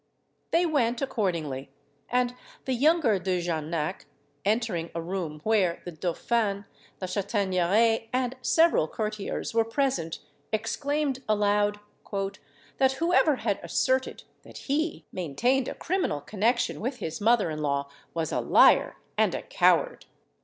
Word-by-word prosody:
They 345 Hz, +2 st, +3 dB
went 245 Hz, -7 st, +1 dB
accordingly; 170 Hz, -, -2 dB, 0.4 s
and 245 Hz, 0 st, +1 dB, 0.3 s
the 265 Hz, -, 0 dB
younger 270 Hz, -, +3 dB
De 185 Hz, 0 st, 0 dB
Jarnac, 160 Hz, -2 st, -3 dB, 0.4 s
entering 205 Hz, -6 st, 0 dB
a -, -, -1 dB
room 165 Hz, -3 st, -4 dB
where 195 Hz, -6 st, +1 dB
the 175 Hz, -, -5 dB
dauphin, 200 Hz, +5 st, -1 dB, 0.3 s
La 185 Hz, -, -4 dB
Chataigneraie, 200 Hz, +3 st, +1 dB
and 255 Hz, 0 st, 0 dB
several 325 Hz, -, +4 dB
courtiers 215 Hz, +3 st, -4 dB
were 225 Hz, 0 st, +4 dB
present, 225 Hz, -, -1 dB, 0.3 s
exclaimed 275 Hz, +5 st, -1 dB
aloud, 205 Hz, 0 st, +2 dB, 1.0 s
"That 265 Hz, -1 st, +4 dB
whoever 330 Hz, 0 st, +3 dB
had 220 Hz, -5 st, -1 dB
asserted 260 Hz, 0 st, 0 dB, 0.2 s
that -, -, -13 dB
he 310 Hz, +4 st, -1 dB
maintained 240 Hz, -, 0 dB
a -, -, -4 dB
criminal 360 Hz, -, -1 dB
connexion 220 Hz, -, 0 dB
with 250 Hz, +3 st, -2 dB
his 165 Hz, -4 st, -5 dB
mother 215 Hz, -5 st, +3 dB
in 155 Hz, 0 st, -4 dB
law 140 Hz, -1 st, 0 dB, 0.3 s
was 165 Hz, -2 st, -1 dB
a -, -, 0 dB
liar -, -, +5 dB, 0.2 s
and -, -, +3 dB
a -, -, -4 dB
coward!" -, -, +2 dB
215 Hz, 130 wpm, -27 LUFS, 175-255 Hz, 1.0 s, liar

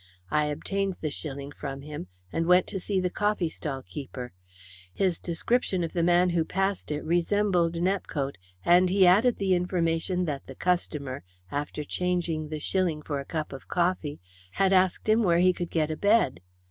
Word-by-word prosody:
I 150 Hz, 0 st, +3 dB
obtained 195 Hz, +6 st, -2 dB
the 155 Hz, -, -2 dB
shilling 140 Hz, -1 st, -5 dB
from 135 Hz, -2 st, -6 dB
him, 150 Hz, -10 st, -7 dB, 0.3 s
and 165 Hz, 0 st, 0 dB
went 180 Hz, 0 st, +6 dB
to 195 Hz, -, -3 dB
see 190 Hz, +1 st, -1 dB
the 180 Hz, -1 st, -1 dB
coffeestall 165 Hz, -10 st, -1 dB
keeper. 130 Hz, -5 st, -7 dB, 0.6 s
His 185 Hz, -, 0 dB
description 185 Hz, +2 st, 0 dB
of 165 Hz, -, -4 dB
the 170 Hz, -, +1 dB
man 175 Hz, +1 st, +4 dB
who 170 Hz, -1 st, +2 dB
passed 195 Hz, +3 st, -1 dB
it 150 Hz, 0 st, -2 dB
resembled 175 Hz, 0 st, +2 dB
Nepcote, 165 Hz, -, -1 dB, 0.3 s
and 180 Hz, +1 st, +5 dB
he 190 Hz, 0 st, +5 dB
added 215 Hz, +7 st, +5 dB
the 195 Hz, -2 st, +1 dB
information 180 Hz, 0 st, 0 dB
that 145 Hz, -4 st, -4 dB
the 135 Hz, -, -9 dB
customer, 150 Hz, -7 st, -1 dB, 0.3 s
after 145 Hz, +1 st, -3 dB
changing 170 Hz, -2 st, -1 dB
the 155 Hz, -1 st, -4 dB
shilling 170 Hz, -2 st, 0 dB
for 145 Hz, -2 st, -3 dB
a 140 Hz, -, -6 dB
cup 155 Hz, -2 st, -4 dB
of 135 Hz, -, -10 dB
coffee, 170 Hz, -4 st, 0 dB, 0.3 s
had 195 Hz, -, +3 dB
asked 185 Hz, +1 st, +2 dB
him 215 Hz, +2 st, +4 dB
where 175 Hz, -5 st, +3 dB
he 185 Hz, +1 st, +5 dB
could 175 Hz, -1 st, -4 dB
get 155 Hz, -2 st, 0 dB
a 155 Hz, -, -3 dB
bed. 205 Hz, -, +3 dB
175 Hz, 175 wpm, -27 LUFS, 150-185 Hz, 0.6 s, went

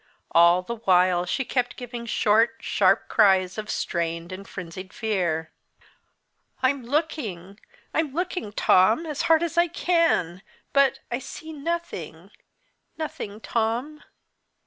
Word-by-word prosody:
All 170 Hz, +2 st, +5 dB
the 235 Hz, +5 st, -5 dB
while 180 Hz, -3 st, +3 dB
she 265 Hz, +8 st, -1 dB
kept 245 Hz, -1 st, -1 dB
giving 240 Hz, -2 st, -7 dB
short, 220 Hz, +1 st, +3 dB
sharp -, -, +2 dB
cries 190 Hz, -3 st, +3 dB
of 215 Hz, 0 st, -6 dB
strained 170 Hz, 0 st, -2 dB
and 195 Hz, +2 st, -8 dB
frenzied 185 Hz, +1 st, -8 dB
fear. 175 Hz, -7 st, -1 dB, 1.1 s
"I'm 270 Hz, +1 st, +2 dB
looking! 230 Hz, -, -3 dB, 0.3 s
I'm 315 Hz, -3 st, 0 dB
looking, 350 Hz, -, -3 dB
Tom, 215 Hz, -, +4 dB
as 300 Hz, -3 st, -3 dB
hard 325 Hz, 0 st, +5 dB
as 340 Hz, 0 st, 0 dB
I 345 Hz, -, +4 dB
can, 330 Hz, -, +1 dB, 0.3 s
but 275 Hz, -1 st, +3 dB
I 240 Hz, -, -1 dB
see 315 Hz, +4 st, -9 dB
nothing 335 Hz, +3 st, -5 dB, 0.7 s
nothing, 220 Hz, -9 st, -6 dB
Tom! 235 Hz, +8 st, -2 dB
225 Hz, 125 wpm, -25 LUFS, 185-300 Hz, 1.1 s, All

